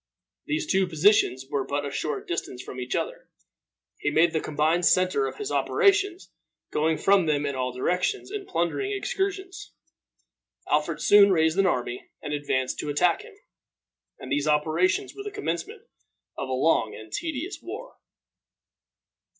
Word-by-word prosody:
These 310 +2 -1
two 190 -9 +2
positions 160 - +3
were 140 -1 -1
but 145 +2 -2
a 140 - -4
short 150 - -3
distance 130 -7 -4
from 130 - -8
each 125 0 -3
other. - - -4 0.7
He - - 0
made 160 +3 +4
them 160 - 0
the - - -8
combined 155 +3 +1
center 180 -6 +3
of - - -7
his 420 0 -4
operations, 395 -3 +2 0.4
going 155 +1 +1
from 195 -4 +3
them 145 -1 +1
in 140 - -1
all 130 -1 -2
directions 180 - -1
in 415 -2 -5
plundering 175 - -1
excursions. 390 -3 -3 0.9
Alfred - - 0
soon 205 -1 +7
raised 160 -1 +2
an 195 - +4
army 125 -6 -2
and 150 - -5
advanced 130 -3 -1
to 150 - -3
attack 180 - +2
him; 445 -1 -14 0.8
and - - -9
these 145 +1 +1
operations 155 +5 +1
were 405 - -7
the 415 - -5
commencement 420 +2 -4 0.5
of 135 - -5
a - - -3
long 130 -4 +2
and 110 0 -11
tedious 325 +4 -4
war. - - -8
170 Hz, 160 wpm, -26 LUFS, -, 0.9 s, soon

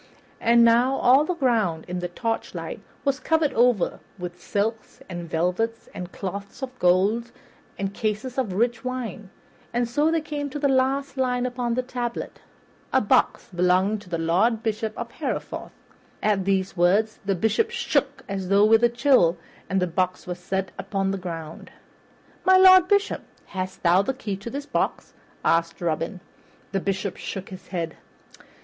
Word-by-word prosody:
And 235 0 +5
now 240 +3 +4
all 270 +3 +5
the 360 - -1
ground 220 - +1
in 180 0 -3
the 180 - -2
torchlight 225 +6 -4 0.2
was 275 0 +1
covered 320 -4 +1
over 240 -5 +2 0.2
with 180 -1 -7
silks 220 +2 -2
and 175 -2 -6
velvets 180 +8 -1
and 180 0 -7
cloths 200 +6 -6
of 255 -1 -6
gold 200 +7 +2 0.5
and 195 0 -3
cases 220 +5 -2
of 220 -8 -1
rich 235 +3 0
wines, 240 -6 -4 0.4
and 240 0 0
so 295 +6 +2
they 330 0 +2
came 290 -1 -4
to 295 - -5
the 290 -1 +1
last 270 +1 +1
line 250 -1 +1
upon 245 -1 -1
the 255 - 0
tablet 245 -2 -4 0.5
"A - - +4
box - - +2
belonging 185 +4 +2
to 200 -3 -15
the 170 - -1
Lord 195 +8 +2
Bishop 220 0 -2
of - - -5
Hereford." - - -4 0.5
At 200 -3 +2
these 195 -1 0
words 200 +5 +2
the 195 0 0
Bishop 225 - +1
shook 285 - -1
as 195 -2 -3
with 210 +4 +5
a 240 - +6
chill, 235 - +4 0.3
and 195 - +1
the 180 - +2
box 185 +1 -1
was 180 0 -5
set 190 +1 -2
upon 195 0 -1
the 195 - -3
ground. 165 -3 -7 0.7
"My 375 0 +6
Lord 370 -1 +8
Bishop, 405 +1 +2 0.2
hast 185 0 -5
thou 175 +2 +5
the 260 +6 -2
key 215 -6 -4
of 200 +4 -6
this 280 +1 -5
box?" 285 - -2 0.3
asked 165 0 +2
Robin. 170 +3 -2 0.5
The 195 - 0
Bishop 195 0 -2
shook 195 0 -6
his 185 -1 -10
head. 170 -3 -4
215 Hz, 165 wpm, -25 LUFS, 185-255 Hz, 0.7 s, Lord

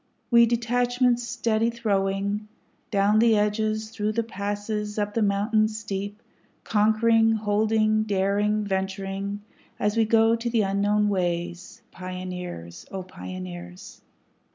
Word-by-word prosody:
We 235 0 +7
detachments 245 +1 +1
steady 230 -2 0
throwing, 200 -2 -1 0.4
Down 205 +1 +3
the 225 -1 +5
edges, 215 +1 0
through 215 -1 -2
the 230 +1 0
passes, 210 0 -4
up 205 0 -1
the 230 - 0
mountains 215 +2 +1
steep, 205 0 -5 0.4
Conquering, 225 +1 +3
holding, 215 0 +2
daring, 205 +1 +1
venturing, 195 +1 -3 0.4
as 210 +1 +1
we 225 -1 +3
go 225 +1 +4
the 230 -1 0
unknown 205 +2 +1
ways, 175 +2 -3
Pioneers! 180 - -7
O 190 -1 -5
Pioneers! 90 - -9
210 Hz, 110 wpm, -25 LUFS, 195-225 Hz, 0.4 s, We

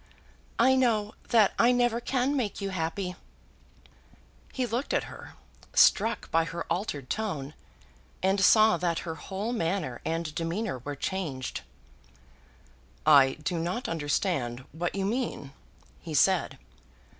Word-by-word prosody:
"I 260 +3 +5
know 220 -5 +1 0.2
that 220 -4 +4
I 245 - +6
never 240 -1 +2
can 260 +3 0
make 235 -7 -2
you 195 -1 -3
happy." 180 +1 -3 1.4
He 255 - -1
looked 245 +4 -2
at - - +1
her, - - -11 0.4
struck 225 +3 +4
by 165 0 +3
her 165 +1 -5
altered 165 -7 -2
tone, 155 -10 -3 0.7
and 195 +1 +2
saw 215 0 +6
that 170 -1 -1
her 165 - -3
whole 195 +7 -4
manner 165 - -2
and 165 -1 -2
demeanour 170 - -2
were 145 +4 -6
changed. 145 -6 -4 1.4
"I 140 -3 +7
do 170 +2 -1
not 180 +9 -2
understand 145 -5 -1
what 170 +3 -3
you 195 -1 -1
mean," 215 - -3 0.5
he 160 -2 -6
said. 185 +5 +3
185 Hz, 130 wpm, -28 LUFS, 160-220 Hz, 1.4 s, I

